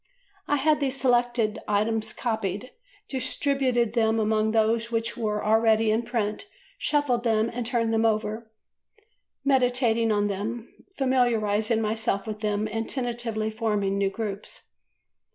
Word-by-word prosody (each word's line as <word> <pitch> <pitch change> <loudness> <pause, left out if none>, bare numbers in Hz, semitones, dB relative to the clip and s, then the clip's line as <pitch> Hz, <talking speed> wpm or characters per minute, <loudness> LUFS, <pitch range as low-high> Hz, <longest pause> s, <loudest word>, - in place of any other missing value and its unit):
I 290 - +2
had 300 +2 +2
these 275 -1 -1
selected 240 -3 +1
items 215 +1 0
copied, 220 -1 -3 0.4
distributed 260 -3 0
them 225 -1 +2
among 215 0 +1
those 225 +1 +1
which 230 0 -1
were 210 -3 -2
already 220 0 +3
in 220 +2 +2
print, 230 - -3 0.3
shuffled 280 -6 +1
them 225 -1 +1
and 240 -1 -3
turned 230 -2 0
them 225 0 +2
over, 220 0 -1 1.0
meditating 245 -4 +2
on 205 -1 +2
them, 220 +4 -4 0.2
familiarising 230 -4 +1
myself 220 -2 -1
with 215 -1 -5
them 210 0 -1
and 225 +1 -3
tentatively 235 -4 -2
forming 210 -3 -1
new 195 -1 +2
groups. 205 - -6
225 Hz, 130 wpm, -26 LUFS, 215-240 Hz, 1.0 s, already